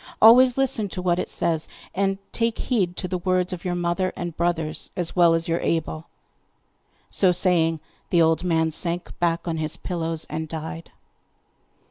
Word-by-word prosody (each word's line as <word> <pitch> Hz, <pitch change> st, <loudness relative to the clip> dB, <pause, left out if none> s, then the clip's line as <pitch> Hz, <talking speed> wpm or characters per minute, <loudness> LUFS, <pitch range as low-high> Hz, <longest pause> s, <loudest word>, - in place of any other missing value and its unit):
Always 245 Hz, +3 st, +7 dB
listen 230 Hz, -6 st, 0 dB
to 180 Hz, -, -5 dB
what 175 Hz, -1 st, +1 dB
it -, -, -3 dB
says, 160 Hz, -2 st, 0 dB, 0.3 s
and 195 Hz, 0 st, 0 dB
take 230 Hz, -1 st, 0 dB
heed 190 Hz, -8 st, -1 dB
to 185 Hz, -, -3 dB
the 180 Hz, 0 st, -3 dB
words 185 Hz, 0 st, 0 dB
of 175 Hz, -, -7 dB
your 180 Hz, -1 st, -2 dB
mother 175 Hz, +1 st, 0 dB
and 175 Hz, -2 st, -5 dB
brothers, 165 Hz, -2 st, -2 dB
as 175 Hz, -2 st, -2 dB
well 170 Hz, -2 st, +5 dB
as 165 Hz, 0 st, -2 dB
you 165 Hz, 0 st, +1 dB
are -, -, -3 dB
able!' 160 Hz, 0 st, -2 dB, 1.0 s
So 185 Hz, -2 st, +4 dB
saying 170 Hz, -3 st, +3 dB, 0.3 s
the 175 Hz, -, +3 dB
old 160 Hz, +2 st, +2 dB
man 160 Hz, -2 st, +1 dB
sank 170 Hz, +2 st, -3 dB
back 170 Hz, 0 st, 0 dB
on 165 Hz, -1 st, -1 dB
his 155 Hz, 0 st, -2 dB
pillows 165 Hz, -2 st, -3 dB
and 160 Hz, 0 st, -4 dB
died. 160 Hz, +1 st, -6 dB
175 Hz, 175 wpm, -24 LUFS, 165-185 Hz, 1.0 s, Always